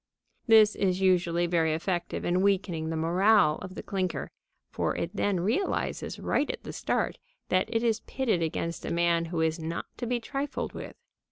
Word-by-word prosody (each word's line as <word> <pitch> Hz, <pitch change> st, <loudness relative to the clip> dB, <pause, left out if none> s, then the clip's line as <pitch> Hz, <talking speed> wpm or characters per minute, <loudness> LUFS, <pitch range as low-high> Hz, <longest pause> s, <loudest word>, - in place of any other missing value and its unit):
This 220 Hz, -2 st, +7 dB
is 185 Hz, -2 st, +1 dB
usually 175 Hz, -2 st, +2 dB
very 165 Hz, -2 st, +2 dB
effective 175 Hz, +1 st, -2 dB
in 180 Hz, +1 st, +2 dB
weakening 185 Hz, -5 st, +1 dB
the 165 Hz, -, -2 dB
morale 175 Hz, +1 st, +3 dB
of 185 Hz, 0 st, -8 dB
the -, -, -6 dB
clinker, 185 Hz, -2 st, -2 dB, 0.4 s
for -, -, -1 dB
it -, -, -3 dB
then 195 Hz, -4 st, +1 dB
realizes 230 Hz, -, -1 dB
right 290 Hz, -, 0 dB
at -, -, -4 dB
the -, -, -7 dB
start -, -, -1 dB, 0.3 s
that 185 Hz, 0 st, +2 dB
it 225 Hz, +1 st, 0 dB
is 225 Hz, -2 st, +2 dB
pitted 230 Hz, -10 st, -1 dB
against 165 Hz, +1 st, -2 dB
a -, -, -3 dB
man 170 Hz, 0 st, +2 dB
who 165 Hz, 0 st, -2 dB
is 160 Hz, +1 st, +1 dB
not 165 Hz, +1 st, -4 dB
to 240 Hz, -, -4 dB
be 245 Hz, 0 st, 0 dB
trifled 275 Hz, +5 st, -4 dB
with. -, -, -8 dB
180 Hz, 180 wpm, -28 LUFS, 170-210 Hz, 0.4 s, This